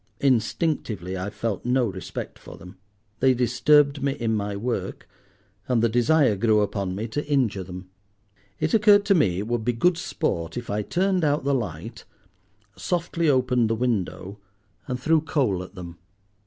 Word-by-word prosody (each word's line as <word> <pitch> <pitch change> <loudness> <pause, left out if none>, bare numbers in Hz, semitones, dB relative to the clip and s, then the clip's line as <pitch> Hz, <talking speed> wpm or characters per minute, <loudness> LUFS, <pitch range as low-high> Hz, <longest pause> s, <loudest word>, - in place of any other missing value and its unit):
Instinctively 115 - 0
I 95 +2 -3
felt 105 0 -4
no 125 +1 +2
respect 95 -4 -6
for - - -12
them; 90 +2 -12 0.4
they 130 -1 +4
disturbed 140 +4 +3
me 140 0 0
in 115 -5 -2
my 100 -1 -2
work, 115 +4 -4 0.6
and 120 -3 +1
the 115 - +4
desire 120 +1 +3
grew 105 +1 +3
upon 100 -2 -2
me 110 +4 -3
to 145 +6 -2
injure 125 -9 +1
them. 90 +1 -9 0.7
It 155 - -1
occurred 205 -2 +5
to 200 - +4
me 105 - +2
it 100 +3 -3
would 120 -1 -1
be 120 +2 0
good 165 +8 +2
sport 95 - -3
if 120 -3 -5
I 105 +1 0
turned 185 - 0
out 145 -1 +1
the 140 +1 +1
light, 95 - -4 0.7
softly 170 -2 -1
opened 125 -4 +2
the 115 - +1
window, 105 -4 -2 0.5
and 125 -1 -3
threw 160 +4 +2
coal 130 - 0
at 90 +2 -11
them. 85 -2 -9
120 Hz, 170 wpm, -24 LUFS, 100-145 Hz, 0.7 s, occurred